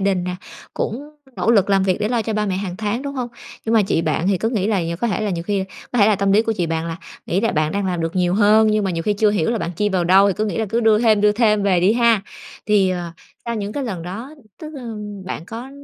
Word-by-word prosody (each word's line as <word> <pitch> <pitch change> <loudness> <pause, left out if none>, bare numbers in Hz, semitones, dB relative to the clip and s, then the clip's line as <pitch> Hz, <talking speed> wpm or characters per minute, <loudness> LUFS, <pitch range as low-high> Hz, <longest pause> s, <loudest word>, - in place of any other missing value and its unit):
đình 190 -2 0
nè, 180 0 -3 0.4
cũng 280 +7 -4 0.3
nỗ 225 - +1
lực 200 -4 +3
làm 195 -1 +3
việc 190 0 +1
để 210 - 0
lo 235 -2 0
cho 220 - -3
ba 210 -1 0
mẹ 185 -1 -1
hàng 190 -2 -4
tháng, 220 +5 -2
đúng 280 0 -5
hông? 250 -2 -3 0.4
Nhưng 225 +1 0
mà 220 - +5
chị 180 -4 0
bạn 160 +3 0
thì 195 - +2
cứ 225 - 0
nghĩ 210 -5 0
là 205 -4 +1
nh 170 0 -3
có 235 - +1
thể 205 - -1
là 210 -2 -1
nhiều 170 -2 -3
khi 195 0 -1 0.3
có 245 - 0
thể 200 - +6
là 210 - +3
tâm 195 0 +1
lý 215 +3 +5
của 225 - -1
chị 175 -5 -1
bạn 165 0 -2
là 165 0 -4 0.3
nghĩ 185 +3 0
là 230 - 0
bạn 155 0 0
đang 200 -1 -1
làm 180 -2 -2
được 165 +2 -3
nhiều 180 0 +2
hơn, 215 +1 +5
nhưng 215 -1 +1
mà 190 - 0
nhiều 165 -1 -2
khi 210 - +1
chưa 210 +1 +2
hiểu 200 -2 0
là 230 - -1
bạn 170 - -3
chi 210 +2 +1
vào 185 -3 0
đâu 195 +3 +5
thì 190 - 0
cứ 215 - 0
nghĩ 215 - -3
là 220 - 0
cứ 230 +3 0
đưa 220 -2 +4
thêm, 220 -3 +3
đưa 210 0 +4
thêm 215 -2 +2
về 185 -3 +2
đi 190 +4 +4
ha. 230 -4 +3 0.4
Thì, 200 -3 +3
ờ, 175 -2 -4 0.3
sau 235 0 -3
những 205 -1 -4
cái 280 -2 -3
lần 185 -8 -4
đó, 225 - -7 0.3
tức, 310 0 -8
ơ, 235 -5 -7 0.3
bạn 165 - -5
có 235 +4 -8
205 Hz, 305 wpm, -20 LUFS, 185-225 Hz, 0.4 s, thể